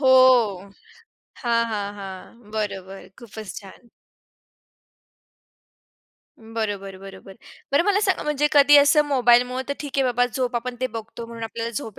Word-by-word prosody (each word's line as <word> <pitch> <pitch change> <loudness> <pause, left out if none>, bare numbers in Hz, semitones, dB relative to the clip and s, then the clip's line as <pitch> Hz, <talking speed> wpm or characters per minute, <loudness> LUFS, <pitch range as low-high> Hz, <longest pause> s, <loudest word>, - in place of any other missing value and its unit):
हो. 270 - 0 1.4
हां, 235 -2 +2
हां, 205 -1 -4
हां. 195 +3 -11
बरोबर, 195 -3 -5
खूपच 220 -3 -9
छान. 205 +4 -16 2.5
बरोबर, 210 -4 -5
बरोबर. 195 0 -12 0.4
बरं, 280 - +4
मला 410 0 +2
सांग 395 -3 +1
म्हणजे 295 -1 +1
कधी 290 0 +7
असं 290 +1 +6
मोबाईलमुळं 250 -2 +3
तर - - 0
ठीक 290 -1 -6
आहे 270 - +3
बाबा 245 -1 +2
झोप 250 -2 -1
आपण 250 +1 -4
ते 255 - +1
बघतो 225 0 -8
म्हणून 230 0 -9
आपल्याला 230 +1 -5
झोप 220 -1 -6
235 Hz, 135 wpm, -23 LUFS, 205-260 Hz, 2.5 s, कधी